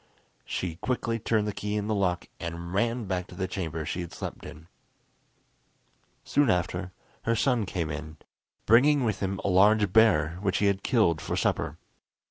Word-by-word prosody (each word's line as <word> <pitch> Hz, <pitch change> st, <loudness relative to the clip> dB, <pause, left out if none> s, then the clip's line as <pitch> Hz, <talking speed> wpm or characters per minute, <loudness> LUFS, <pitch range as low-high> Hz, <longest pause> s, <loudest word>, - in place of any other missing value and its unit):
She 85 Hz, -3 st, -3 dB
quickly 115 Hz, +1 st, -2 dB
turned 110 Hz, -1 st, +1 dB
the 105 Hz, -, -2 dB
key 105 Hz, +1 st, -3 dB
in 105 Hz, -1 st, -1 dB
the 110 Hz, -, 0 dB
lock, 90 Hz, -4 st, 0 dB
and 85 Hz, +1 st, -6 dB
ran 115 Hz, +3 st, 0 dB
back 90 Hz, -2 st, -2 dB
to -, -, -12 dB
the 95 Hz, 0 st, -2 dB
chamber 80 Hz, -4 st, -4 dB
she 90 Hz, -, -3 dB
had 85 Hz, -1 st, -7 dB
slept -, -, -7 dB
in. 80 Hz, +2 st, -12 dB, 1.6 s
Soon 145 Hz, -3 st, +2 dB
after 90 Hz, 0 st, -1 dB, 0.3 s
her 115 Hz, -, +2 dB
son 120 Hz, -3 st, +1 dB
came 85 Hz, -4 st, -2 dB
in, 75 Hz, +1 st, -7 dB, 0.5 s
bringing 135 Hz, +5 st, +5 dB
with 110 Hz, -4 st, -1 dB
him 95 Hz, -1 st, -2 dB
a -, -, -1 dB
large 100 Hz, +1 st, +4 dB
bear, 90 Hz, -7 st, +4 dB
which 95 Hz, -2 st, 0 dB
he 105 Hz, -, +1 dB
had 100 Hz, -1 st, +2 dB
killed 100 Hz, -, +2 dB
for -, -, -3 dB
supper. -, -, -1 dB
95 Hz, 175 wpm, -27 LUFS, 85-110 Hz, 1.6 s, bringing